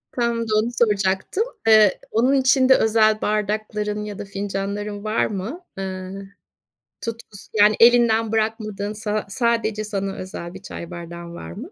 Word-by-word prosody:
Tam 235 -1 0
da, 215 - -1
onu 230 +3 -1
soracaktım. 205 - +1 0.2
Eee, 215 -3 +6
onun 250 +5 +3
için 265 -1 +4
de 265 - +8
özel 215 -1 +3
bardakların 210 0 -1
ya 210 -2 -7
da - - -5
fincanların 200 +1 -4
var 215 +1 +1
mı? 215 - -5 0.2
Eee, 185 -1 -5 0.9
tutkusu 230 -3 -8
Yani, 210 0 +5
elinden 230 -2 +5
bırakmadığın 215 -2 -2
sa 210 0 -2
sadece 225 -2 0
sana 195 -2 -3
özel 180 -2 -7
bir 190 - -10
çay 170 -3 -8
bardağın 170 0 -8
var - - -8
mı? 255 - -9
215 Hz, 150 wpm, -22 LUFS, 195-225 Hz, 0.9 s, de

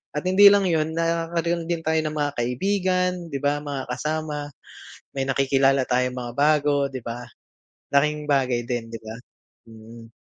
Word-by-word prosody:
at 150 - -2
hindi 200 +2 +7
lang 200 -1 +4
yun 160 -2 +1
nagkakaroon 165 0 -1
din 165 -1 -2
tayo 160 0 +1
ng 155 0 -3
mga 145 -1 0
kaibigan, 180 +8 0 0.2
di 140 - -3
ba, 145 +1 +1
mga 140 -3 -5
kasama, 150 +1 -3 0.7
may 135 - 0
nakikilala 135 0 +2
tayong 125 0 0
mga 120 -1 -5
bago, 145 -1 +2
di 130 - -5
ba? 115 +1 -5 0.7
Laking 150 +1 +2
bagay 130 -4 +2
din, 120 -2 -3
di 115 - -5
ba? 110 0 -8 0.5
Mm. 115 +1 -13
145 Hz, 160 wpm, -24 LUFS, 125-160 Hz, 0.7 s, hindi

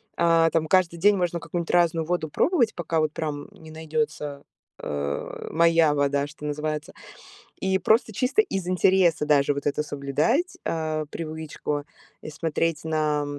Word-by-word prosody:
а, 165 -1 +4
там 160 -1 +1
каждый 180 -2 +3
день 200 +4 +4
можно 175 -1 -1
какую-нибудь 165 +1 -3
разную 170 -2 +2
воду 170 -2 -1
пробовать, 250 - +2
пока 165 -2 -1
вот 155 -1 0
прям 150 -3 -4
не 160 -1 -14
найдется, 160 0 -2 0.5
а, 70 -1 -4
моя 165 -2 +4
вода, 140 0 +1
что 150 0 -11
называется. 150 0 -3 0.7
И 190 0 +1
просто 220 +2 +2
чисто 255 - +2
из 195 - -4
интереса 180 -3 +3
даже 145 -1 +3
вот 140 0 -5
это 145 +1 0
соблюдать, 150 - 0
а, 155 -1 -2
привычку 155 -2 -5 0.4
и - - -7
смотреть 165 0 -1
на 155 -2 0
160 Hz, 150 wpm, -25 LUFS, 150-175 Hz, 0.7 s, а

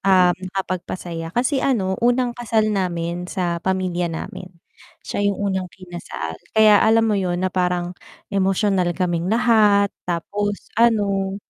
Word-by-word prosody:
um, 185 -2 +5
nakakapagpasaya. 185 -3 -5
Kasi 260 +2 +1
ano, 200 -9 +1
unang 245 +1 +2
kasal 220 -3 0
namin 175 -2 -2
sa 175 -3 -2
pamilya 185 -2 -1
namin- 165 +2 -6 0.6
siya 205 0 -1
yung 200 - -1 0.2
unang 185 -1 -2
kinasal. 175 - -8 0.2
Kaya 215 -2 +7
alam 225 +1 +4
mo 210 -3 +1
yun 175 -1 -1
na 185 - -1
parang 180 -1 0 0.4
emosyonal 195 -2 +1
kaming 175 -1 -1
lahat 215 -3 +4 0.2
tapos 205 +4 -3
ano, 200 -4 +2
190 Hz, 130 wpm, -21 LUFS, 180-210 Hz, 0.6 s, Kaya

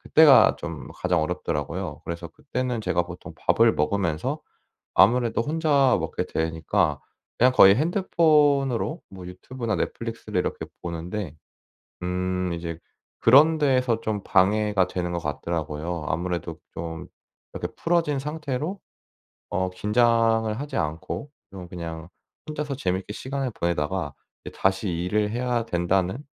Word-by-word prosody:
그때가 155 -3 +6
좀 - - -7
가장 90 -3 +1
어렵더라고요. 80 0 -3
그래서 85 0 -5
그때는 125 -5 -3
제가 90 -4 +1
보통 90 0 -10
밥을 - - +3
먹으면서 85 0 -1 0.5
아무래도 115 +2 +4
혼자 145 -3 +3
먹게 - - -3
되니까 80 0 0 0.4
그냥 125 +2 +5
거의 100 -4 +8
핸드폰으로 150 - +2
뭐 95 -2 -10
유튜브나 115 +3 -4
넷플릭스를 - - -3
이렇게 - - -3 0.2
보는데 85 0 -5 0.7
음. 90 0 -1
이제 85 -1 -5 0.4
그런 150 +7 +6
데에서 130 -5 +2
좀 105 -3 -2
방해가 105 0 +3
되는 90 -1 -3
것 85 - -1
같더라고요. 80 +1 -3
아무래도 85 0 -2 0.2
좀 80 -1 -6 0.5
이렇게 - - -4
풀어진 165 -4 +1
상태로 150 +4 -3 0.7
어 95 -2 0
긴장을 115 +2 +2
하지 145 +1 -5
않고 80 - -3 0.2
좀 95 -3 -9
그냥 85 -2 -7 0.4
혼자서 150 -3 -3
재미있게 95 -2 -2
시간을 135 +2 -3
보내다가 85 -2 -2 0.3
이제 - - -7
'다시 95 +1 +1
일을 90 +5 0
해야 120 0 -1
된다.'는 95 +2 0
95 Hz, 305 characters per minute, -25 LUFS, 85-130 Hz, 0.7 s, 거의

